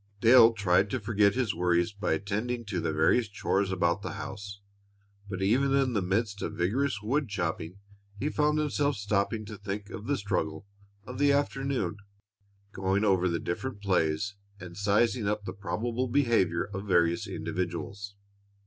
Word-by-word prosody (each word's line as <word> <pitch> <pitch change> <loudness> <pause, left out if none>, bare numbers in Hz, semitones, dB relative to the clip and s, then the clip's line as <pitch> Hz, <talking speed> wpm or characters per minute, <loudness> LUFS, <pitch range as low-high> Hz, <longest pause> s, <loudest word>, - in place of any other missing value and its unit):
Dale 115 0 +7
tried 95 -1 +2
to 130 - -1
forget 105 -1 +2
his 125 -6 0
worries 85 +2 +1
by 100 +1 -1
attending 110 +4 -2
to 100 -3 -2
the 80 -1 -1
various 80 +9 +2
chores 100 -1 0
about 90 +1 +1
the - - -5
house, 100 +1 -7 0.7
but 95 -1 -3
even 135 +7 +3
in 135 -2 +2
the 105 - +1
midst 100 +2 -1
of - - -4
vigorous 105 +4 0
woodchopping 100 - -2 0.4
he 140 - -1
found 150 0 +1
himself 145 -1 +1
stopping 105 +1 -1
to 105 -1 -9
think 100 +1 -5
of 110 +1 -7
the 140 0 +1
struggle 90 -5 -2 0.4
of 125 0 -7
the 145 0 +4
afternoon, 135 -8 0 0.7
going 95 +2 0
over 95 -3 +3
the 85 - 0
different 105 +6 -4
plays 95 -1 0 0.3
and 90 -2 -9
sizing 105 +3 +1
up 105 0 -1
the 90 - -5
probable 115 +5 -2
behavior 115 -10 +2
of 100 +2 -5
various 85 +2 +2
individuals. 90 +3 -4
100 Hz, 160 wpm, -29 LUFS, 95-120 Hz, 0.7 s, Dale